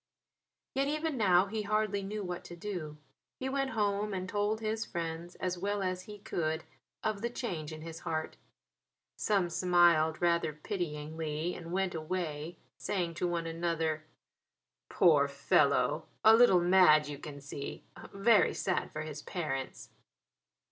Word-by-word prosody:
Yet 275 +1 +1
even 305 +1 -1
now 190 -5 +4
he 215 +2 -3
hardly 210 -1 0
knew 205 +2 -4
what 180 -1 -5
to 175 - -9
do. 170 -5 -5 0.4
He 260 - -2
went 275 0 0
home 205 0 0
and 185 0 -3
told 205 +3 0
his 220 0 -1
friends 170 +1 -5
as 180 -1 -3
well 200 +1 -1
as 185 -1 -1
he 210 -1 -9
could 165 -6 -2 0.4
of 215 -2 -1
the 235 - -1
change 175 - -4
in 155 0 -8
his 165 0 -7
heart. 160 0 -3 0.8
Some 200 -4 +1
smiled 170 -3 +4
rather 170 -3 +2
pityingly 155 0 -3
and 170 -1 -8
went 190 0 0
away 160 -1 -4 0.2
saying 175 -4 -1
to 175 +2 -1
one 170 -1 -1
another: 165 -1 -1 0.9
"Poor - - +5
fellow; - - +2 0.2
a 220 +1 +9
little 225 -7 +6
mad, 175 -4 +6
you 145 -1 -6
can 145 -2 -8
see; 140 0 -7 0.3
very 205 +3 +4
sad 185 - -1
for 155 - -4
his 150 -1 -6
parents!" 140 -8 -4
175 Hz, 150 wpm, -32 LUFS, 160-205 Hz, 0.9 s, a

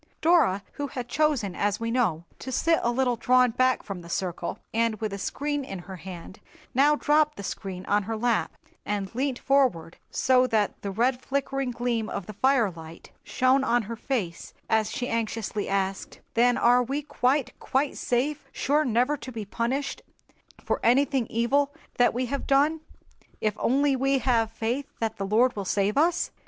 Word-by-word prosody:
Dora, 315 - +3
who 285 - -4
had 250 -2 -6
chosen, 275 -9 +1
as 205 +2 0
we 230 0 -2
know, 215 -10 +1 0.2
to 260 - -6
sit 325 +5 +2
a 235 - +1
little 245 0 +1
drawn 250 +1 +4
back 255 +2 +2
from 195 -3 -6
the 170 - -12
circle, 175 -1 -3 0.2
and 230 0 +1
with 215 -2 -3
a 200 - -5
screen 290 +6 -2
in 195 -7 -6
her 185 +1 -9
hand, 185 +2 -9 0.3
now 285 +4 +5
dropped 300 +1 +2
the 200 - -6
screen 190 -1 -5
on 205 +1 +2
her 220 +2 -4
lap, 235 0 +1 0.3
and 200 -1 -3
leant 260 +1 -1
forward, 255 -14 +1
so 255 -1 +3
that 215 -4 0
the 200 - -4
red 245 +6 +1
flickering 275 -1 -2
gleam 235 -2 -2
of 195 - -4
the 215 - -8
fire 245 -1 +2
light 165 -1 -12
shone 260 +1 +2
on 240 -2 +2
her 230 +3 -6
face 215 -9 -4
as 220 -1 +2
she 250 - -3
anxiously 225 -2 -2
asked, 195 0 -2
"Then 245 +1 +3
are 245 +1 +5
we 275 +4 -2
quite, 275 -1 0
quite 270 +2 0
safe, 275 +5 -1
sure 295 +2 +1
never 250 +2 +2
to 260 - -8
be 225 -3 -5
punished 245 +7 -2 0.6
for - - 0
anything 265 0 +3
evil 275 +6 +1 0.2
that 245 - +5
we 250 +2 -1
have 275 +3 -4
done, 290 +4 +3 0.6
if 215 -1 0
only 275 +2 +2
we 270 +1 +2
have 235 -3 +2
faith 240 +6 -3
that 225 -1 -2
the 195 - -3
Lord 240 +5 +3
will 200 - -3
save 200 +2 0
us?" 330 +4 +2
245 Hz, 180 wpm, -26 LUFS, 210-270 Hz, 0.6 s, now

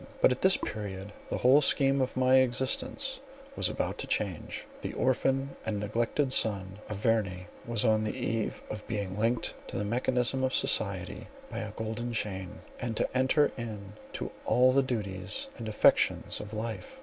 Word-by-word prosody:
But, - - +6
at 125 - -2
this 190 0 +5
period, 100 -1 -5 0.2
the - - -1
whole 130 +4 +6
scheme 135 -1 +3
of 130 - -1
my 130 0 +5
existence 130 - +1 0.4
was - - +3
about - - -2
to - - -4
change. - - -2 0.2
The - - -4
orphan 135 +1 +1
and 105 -2 -2
neglected 115 +6 0
son 100 -5 +1
of 105 - -3
Verney, 100 -5 0 0.2
was 115 -1 +1
on 110 -1 +3
the 105 - -2
eve 115 -3 -2
of 105 0 -7
being 100 -4 -3
linked 115 +3 0
to - - -5
the 105 - -1
mechanism 125 +3 +1
of 130 0 +1
society - - 0 0.2
by - - -3
a 105 - -4
golden 110 +2 -4
chain, 95 -5 -3 0.2
and 115 -2 -3
to - - -1
enter 130 +3 +3
into 105 -3 -7
all 125 +1 +5
the 135 +1 +4
duties 100 -7 -3
and 115 - -5
affections 105 - +3
of 105 0 -7
life. 115 - -5
115 Hz, 170 wpm, -30 LUFS, 105-130 Hz, 0.4 s, But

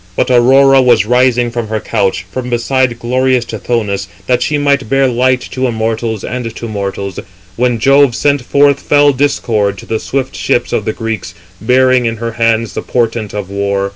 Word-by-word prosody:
But - - 0
Aurora 135 +2 +5
was 120 -6 +3
rising 125 0 +2
from 120 -2 -4
her 110 0 -2
couch, 95 -3 -1
from 125 +2 -5
beside 120 0 0
glorious 125 +1 0
Tithonus, 105 -3 -3 0.2
that 125 -1 +1
she 150 +3 0
might 140 -4 0
bear 135 0 +2
light 125 +1 +1
to 130 0 -1
immortals 110 -1 -2
and 115 -2 -5
to 115 - -6
mortals, 100 -2 -4 0.4
when 120 +1 +1
Jove 135 +1 +3
sent 145 0 +1
forth 140 +2 +2
fell 145 -1 +3
Discord 110 -7 0
to - - -10
the 110 - -2
swift 135 +2 -3
ships - - -1
of - - -1
the - - -1
Greeks, 115 -4 -5 0.3
bearing 125 +1 +3
in 115 0 -3
her 115 +1 -4
hands 115 -1 0
the - - -4
portent 115 -3 -2
of 100 -2 -5
war. 100 0 -1
120 Hz, 180 wpm, -13 LUFS, 110-130 Hz, 0.4 s, Aurora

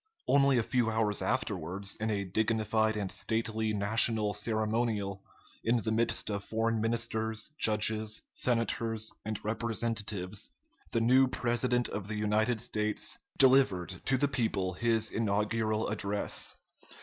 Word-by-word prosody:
Only 140 -2 +5
a 115 - +2
few 120 -1 +1
hours 110 -2 0
afterwards, 95 +5 -2
in 110 0 -1
a 100 -2 -1
dignified 110 +2 +1
and 100 -3 -3
stately 110 -1 -1
national 105 +1 +2
ceremonial, 110 -1 -1 0.4
in 120 +1 +2
the 110 - -1
midst 115 -1 +1
of 100 0 -3
foreign 115 +1 0
ministers, 110 +1 -1
judges, 110 0 +2
senators, 115 -2 -1
and 110 -1 -3
representatives, 110 -3 -2 0.4
the 115 - +1
new 130 +3 +5
President 120 0 +1
of 100 -1 -5
the 110 - -4
United 110 +2 +1
States 105 -3 -2 0.2
delivered 105 -10 +4
to 135 - +2
the 145 +2 +2
people 110 -8 -1
his 110 +2 0
inaugural 110 0 0
address. 105 -1 -1
110 Hz, 125 wpm, -31 LUFS, 105-115 Hz, 0.4 s, Only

